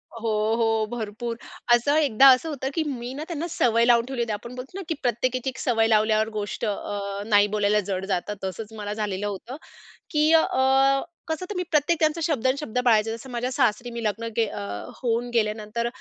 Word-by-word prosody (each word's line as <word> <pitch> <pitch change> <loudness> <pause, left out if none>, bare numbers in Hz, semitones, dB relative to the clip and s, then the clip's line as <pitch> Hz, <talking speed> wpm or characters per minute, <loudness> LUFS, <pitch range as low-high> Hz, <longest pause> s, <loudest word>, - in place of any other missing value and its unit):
हो, 230 0 -3 0.3
हो. 225 -1 +1
भरपूर. 230 +2 -4 0.4
असं 285 +5 +1
एकदा 275 -3 +5
असं 320 +6 -6
होतं 270 -2 -3
की 325 - 0
मी 250 -2 -4
ना 295 +3 -5
त्यांना 335 0 -3
सवय 235 -7 +2
लावून 235 -1 +4
ठेवली 260 -2 -3
होती, 230 -2 -1
आपण 235 +4 -7
बोलतो 265 +9 -8
ना - - -4
की - - +1
प्रत्येक 250 0 0
एक-एक 255 +1 -3
सवय 225 -2 +2
लावल्यावर 215 0 +3
गोष्ट 205 +2 -4
अ, 200 -1 -3
नाही 205 -2 +4
बोलायला 210 0 +3
जड 190 0 -2
जातात, 195 +1 -2
तसंच 210 +3 -5
मला 205 0 -4
झालेलं 205 -2 -2
होतं. 205 +6 -6 0.6
की 305 +1 +3
अ, 320 - +6 0.9
कसं 320 +3 -2
तर 415 - -5
मी 360 - -1
प्रत्येक 305 +2 +2
त्यांचा 315 +1 +1
शब्द 270 -6 0
आणि 260 +2 +2
शब्द 250 -5 -5
पाळायचे. 225 -1 +4
जसं 230 +4 -7
माझ्या 245 +1 -2
सासरी 240 0 +1
मी 235 -1 -5
लग्न 220 +2 -2
गे 225 - +4
अ, - - -6 0.4
होऊन 240 0 0
गेल्यानंतर 215 +1 -1
235 Hz, 200 wpm, -25 LUFS, 215-265 Hz, 0.9 s, अ